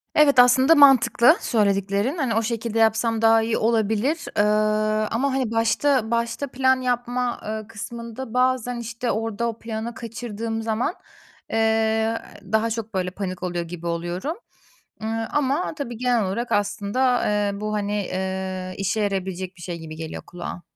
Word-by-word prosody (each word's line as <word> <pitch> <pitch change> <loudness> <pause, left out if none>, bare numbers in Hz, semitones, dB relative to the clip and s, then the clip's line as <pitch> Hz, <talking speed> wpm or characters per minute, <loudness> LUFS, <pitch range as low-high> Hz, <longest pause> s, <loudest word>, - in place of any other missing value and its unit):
evet, 285 -4 +5
aslında 260 +5 +6
mantıklı 270 0 +6
söylediklerin. 200 - +1
Hani 265 -8 0
o 225 - +3
şekilde 230 0 -2
yapsam 225 0 +2
daha 225 0 +5
iyi 225 0 0
olabilir. 225 +7 +1
Iıı, 215 +1 +2
ama, 265 +4 0
hani, 260 -4 -1
başta 230 +1 +2
başta 235 +4 -1
plan 260 0 +2
yapma, 245 0 -1
ııı, 215 0 -4
kısmında 230 +2 -7
bazen, 250 -1 +1
işte, 235 +1 -3
orada 225 +1 -2
o 225 - -7
planı 225 +1 -5
kaçırdığım 225 -1 -5
zaman, 225 - -1 0.6
eee, 220 0 +1 0.3
daha 220 +1 +2
çok, 225 -1 -4
böyle, 180 -1 -1
panik 185 -2 -5
oluyor 175 -1 -2
gibi 170 0 -7
oluyorum, 175 - -3 0.7
ııı, 225 +1 -2
ama 295 +5 0
tabii 240 -6 -5
genel 245 -2 +1
olarak 235 +6 -3
aslında, 205 +5 +1
eee, 205 -1 0
bu, 215 0 -2
hani, 205 -1 -1
eee, 185 0 -4
işe 195 +3 -1
yarayabilecek 190 -2 -3
bir 175 - -13
şey 175 -1 -5
gibi 160 -1 -8
geliyor 160 0 -7
kulağa. 175 0 -7
225 Hz, 150 wpm, -23 LUFS, 205-245 Hz, 0.7 s, aslında